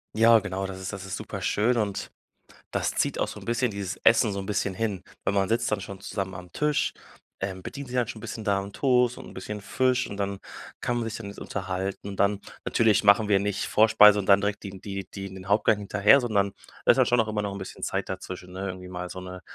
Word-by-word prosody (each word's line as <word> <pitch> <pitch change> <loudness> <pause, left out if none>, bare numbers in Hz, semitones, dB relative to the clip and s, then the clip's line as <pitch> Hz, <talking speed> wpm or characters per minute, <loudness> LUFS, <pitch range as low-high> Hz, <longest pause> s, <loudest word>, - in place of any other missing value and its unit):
Ja, 115 +1 +7
genau, 95 -2 -3
das 95 -1 -6
ist 95 - -5
das 100 -1 -7
ist 95 - -4
super - - -6
schön 120 +4 +1
und 105 -3 -2 0.6
das - - 0
zieht - - 0
auch - - 0
so - - -8
'n - - -12
bisschen 120 0 +1
dieses 100 -2 -4
Essen 115 -2 +5
so 100 - -3
'n 95 - -5
bisschen 100 -1 -1
hin. 100 -2 -2 0.2
Weil - - +1
man 100 -1 +2
sitzt 115 +1 0
dann 105 - +1
schon 95 0 -8
zusammen 95 -2 -4
am 90 0 -10
Tisch, 150 +5 +1 0.5
ähm, 95 -1 -4
bedient 140 -1 -7
sich 125 - -6
dann 125 -3 +1
schon 110 - -6
'n - - -13
bisschen 110 0 -6
da 100 -2 +2
'n 100 +1 -8
Toast 125 -2 +2
und - - -9
'n - - -12
bisschen 105 +2 -6
Fisch 130 +5 +1
und 100 - -6
dann 100 -1 -2 0.4
kann 120 - 0
man 120 - -1
sich 115 0 -4
dann 115 - -7
jetzt 100 - -9
unterhalten 95 +1 -4
und 100 - -8
dann 100 0 +2 0.2
natürlich 110 -3 +3
machen 100 +1 +5
wir 100 -2 +5
nicht 100 0 -1
Vorspeise 105 -1 +6
und 100 - -3
dann 100 0 +6
direkt 100 0 -2
die 100 - -6
n 95 - -11
die 100 -1 -5
die 95 -1 -6
den 95 0 -10
Hauptgang 105 +1 +3
hinterher, 105 +6 +5
sondern 100 -6 +1 0.3
da - - +7
ist - - +2
halt - - +4
schon 120 -1 +4
auch 110 - -3
immer 105 -1 -1
noch 100 -1 -3
'n - - -6
bisschen 95 -1 -8
Zeit - - -2
dazwischen, 90 0 -6
ne? 95 +2 -4
Irgendwie 90 -1 -7
mal 90 0 -5
so 95 - -7
'ne 90 0 -8
100 Hz, 260 wpm, -26 LUFS, 95-110 Hz, 0.6 s, Ja